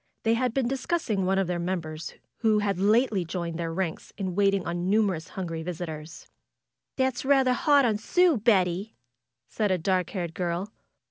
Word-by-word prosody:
They 225 - +3
had 250 +1 +1
been 255 0 0
discussing 260 - -1
one 190 0 +2
of 195 - +2
their 175 0 -2
members, 165 -3 -4 0.2
who 220 -2 +3
had 200 -3 0
lately 210 0 +3
joined 170 -1 -4
their 165 -1 -2
ranks 170 -1 -3
in 190 -3 -3
waiting 195 -1 +2
on 170 +1 -2
the - - -3
numerous 195 -6 +1
hungry 165 -4 -5
visitors. 160 -2 -6 0.7
^'That's 260 -2 0
rather 265 -2 +4
hard 285 +1 +4
on 215 -3 +1
Sue, 355 +6 +3
Betty 195 -2 +1 0.5
said 215 -2 -1
a 185 - +2
dark 180 0 0
haired 175 -4 -4
girl. 180 +3 -3
195 Hz, 175 wpm, -27 LUFS, 175-225 Hz, 0.7 s, rather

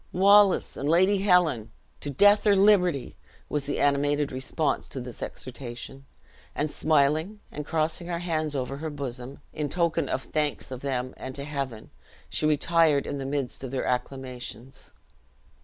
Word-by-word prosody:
"Wallace 200 +1 +5
and 140 - -2
Lady 185 +4 +4
Helen! 180 - +3 0.3
to 145 - -5
death 205 +9 +5
or 205 - +6
liberty!" 190 -8 +3 0.3
was 145 -1 -2
the 145 - -2
animated 145 0 +2
response 135 +4 -2
to 135 - -7
this 125 -1 -8
exhortation; 130 +1 -7 0.5
and 150 0 -1
smiling 155 +6 +1
and 150 +1 -6
crossing 160 +2 -1
her 175 -1 -2
hands 155 -3 -2
over 135 +1 -3
her 160 +2 -4
bosom, 135 -2 -6
in 150 -1 -3
token 165 -2 0
of 130 - -1
thanks 150 -3 -2
of 130 - -5
them 130 -2 -2
and 130 0 -7
to 140 - -5
Heaven, 140 -6 -5 0.4
she 155 - 0
retired 155 -1 +3
in 140 - -4
the 135 - -4
midst 135 -2 -3
of 130 - -4
their 130 0 -2
acclamations. 125 0 -5
145 Hz, 155 wpm, -27 LUFS, 135-165 Hz, 0.5 s, or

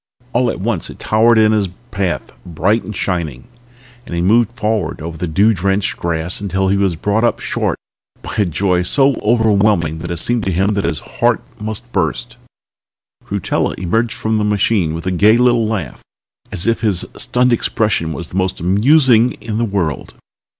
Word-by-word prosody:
All 125 +1 +2
at - - -4
once 100 -3 -2
it - - -10
towered 115 +2 +3
in 110 -1 +5
his 105 -3 +1 0.2
path, 95 -4 -2
bright 95 +6 0
and 105 - -7
shining, 80 -10 -3 0.6
and 85 - -7
he 85 - -1
moved 115 +4 +3
forward 105 -7 -1
over 80 +1 -6
the 85 +3 -4
dew 100 +8 +3
drenched 95 +1 0
grass 85 +2 -2
until 95 -1 0
he 100 - +2
was 100 -3 +1
brought 105 +7 0
up 120 - +1
short - - -1 0.5
by - - -6
a 105 - +3
joy 90 +1 0
so 135 +10 +3
overwhelming 100 -8 +2
that 85 - -6
it 85 - -3
seemed 120 +6 -1
to 95 - 0
him 95 +3 +1
that 100 -2 -1
his 85 -2 -2 0.2
heart - - +2 0.2
must 110 +3 -6
burst. 110 +7 -2 0.9
Rutella - - -1
emerged 110 +6 -1
from 110 0 0
the - - 0
machine 100 -5 +1
with 85 - -6
a 95 - 0
gay 105 +5 +4
little 120 -2 +3
laugh, 95 - -4 0.5
as 85 - -2
if 115 0 +1
his 105 -6 +1
stunned 125 0 +1
expression 105 -7 0
was 85 +1 -6
the 90 - -5
most 95 0 -1
amusing 120 - +4
in 110 -1 -5
the 120 - +1
world. 95 -8 -3
100 Hz, 185 wpm, -17 LUFS, 90-115 Hz, 0.9 s, in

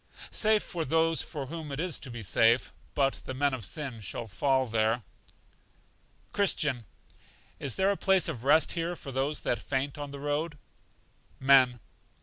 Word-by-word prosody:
Safe 215 -1 +3
for 170 -3 -3
those 165 +2 +2
for 145 -4 -5
whom 155 +1 -7
it 140 - -4
is 180 -1 -1
to 130 - -5
be 120 -2 -7
safe; 115 +5 +3 0.2
but 135 -1 +1
the 130 - -4
men 140 +1 +1
of 125 -4 -4
sin 130 +3 -4
shall 105 +4 -4
fall 130 +6 +1
there. 110 0 +1 1.3
Christian. 150 - +1 0.7
Is 135 -4 -1
there 195 +1 +3
a 200 - -1
place 190 -2 +3
of 130 -8 -4
rest 150 +4 +4
here 170 +1 -2
for 140 - -8
those 135 +3 -1
that 120 - -1
faint 140 +1 -2
on 145 -1 -5
the 140 0 -8
road? 145 +2 -2 0.8
Men. 130 -2 +5
140 Hz, 165 wpm, -29 LUFS, 125-160 Hz, 1.3 s, Men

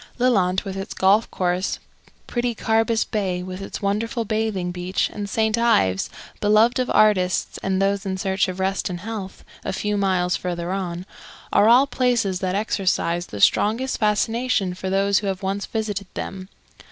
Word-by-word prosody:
Lelant 195 -7 +2
with 195 -1 -5
its 195 +1 -5
golf 200 +4 +3
course, 180 +1 -1 0.5
pretty 240 -1 -1
Carbis 225 +1 +1
Bay 185 -5 -2
with 185 +1 -7
its 195 - -7
wonderful 225 +4 -1
bathing 215 -4 -1
beach, 180 +1 -1
and 205 -1 -5
St. 220 +1 +1
Ives, 155 - +2 0.3
beloved 215 +4 +4
of 255 - 0
artists 185 -4 +2
and 190 -1 0
those 195 +1 +1
in 190 -2 -3
search 190 0 0
of 185 0 -5
rest 190 0 0
and 175 -1 -5
health, 205 -2 -7 0.2
a - - -2
few 210 +2 -1
miles 185 -3 +1
further 175 0 -3
on, 180 -2 -3 0.5
are 210 - +5
all 250 +4 +7
places 240 -9 0
that 185 0 -1
exercise 180 -4 0
the 105 - -7
strongest 230 - +2
fascination 215 -2 +1
for 185 +1 -5
those 195 +1 +2
who 205 - -4
have 190 0 -3
once 195 +1 -2
visited 205 -3 -3
them. 190 0 -6
195 Hz, 165 wpm, -23 LUFS, 185-220 Hz, 0.5 s, all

